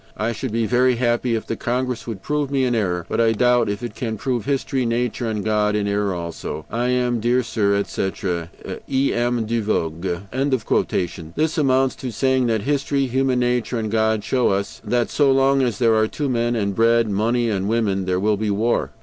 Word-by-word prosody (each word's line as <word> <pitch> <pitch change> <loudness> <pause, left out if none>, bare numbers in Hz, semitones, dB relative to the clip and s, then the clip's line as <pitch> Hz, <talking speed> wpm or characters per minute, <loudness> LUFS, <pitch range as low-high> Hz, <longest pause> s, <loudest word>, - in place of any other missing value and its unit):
"I 110 +3 0
should 115 +2 -4
be 115 +1 0
very 125 +2 +3
happy 120 0 +1
if 110 - -3
the 115 - -3
Congress 125 0 -2
would 110 -5 -6
prove 150 -2 -1
me 135 -1 +1
in 125 -1 +1
error. 90 -6 -1
But - - 0
I 115 -1 +3
doubt 120 0 +3
if 100 +3 -3
it 120 - -4
can 110 -3 -4
prove 125 -3 -2
history, 135 -1 0
nature, 120 0 -1
and 105 -2 -3
God 105 -1 +1
in 105 -1 0
error 100 -2 0
also. 85 -2 -5
"I 120 +2 0
am, 125 -1 +1
dear 120 +3 +2
sir, 105 -3 +1
etc. 95 -3 -2 0.4
"E. 135 0 +1
M. 120 -1 0
DE 115 +1 -1
VOGÜÉ." 95 - -1
This 160 +1 0
amounts 135 -2 +3
to 130 -2 -5
saying 130 +2 +1
that 110 -2 +1
history, 140 +1 0
human 130 0 +1
nature, 125 -1 0
and 110 -2 -3
God 110 -1 +1
show 125 +1 +1
us 100 +1 -2
that 120 -1 0
so 145 -2 +3
long 135 0 +3
as 125 -4 0
there 115 -3 +3
are 110 0 +3
two 145 +4 -3
men, 120 -1 0
and 100 -3 -1
bread, 115 +1 +3
money 115 +3 +1
and 95 -2 -1
a - - -1
woman 105 -4 0
there 90 0 0
will 105 +1 +1
be 105 +1 -1
war. 110 +4 +1
115 Hz, 210 wpm, -21 LUFS, 105-125 Hz, 0.4 s, very